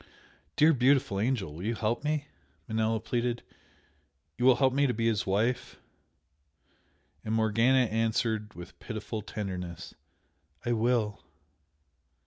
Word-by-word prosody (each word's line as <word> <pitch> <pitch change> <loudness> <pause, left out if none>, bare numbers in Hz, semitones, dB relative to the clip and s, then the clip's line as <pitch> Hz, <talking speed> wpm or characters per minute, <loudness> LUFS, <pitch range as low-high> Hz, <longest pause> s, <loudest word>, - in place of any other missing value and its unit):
"Dear, 160 +2 +5
beautiful 130 -5 +2
angel, 100 - -1
you 110 +5 -1
will - - -10
help 115 +5 -1
me?" 150 -1 -1 0.4
Manella 110 0 0
pleaded 120 +1 -2 0.9
"You 125 - -1
will 130 -1 +7
help 130 -1 +2
me 140 +1 +3
to 125 - -1
be 115 +1 -1
his 110 -4 +1
wife?" 110 +6 0 1.4
And 110 +1 -1
Morgana 115 +4 +3
answered 110 -1 -1
with 90 0 -11
pitiful 110 -1 -5
tenderness. 90 -5 -6 0.7
"I 120 - 0
will!" 115 -2 +1
115 Hz, 120 wpm, -29 LUFS, 105-125 Hz, 1.4 s, will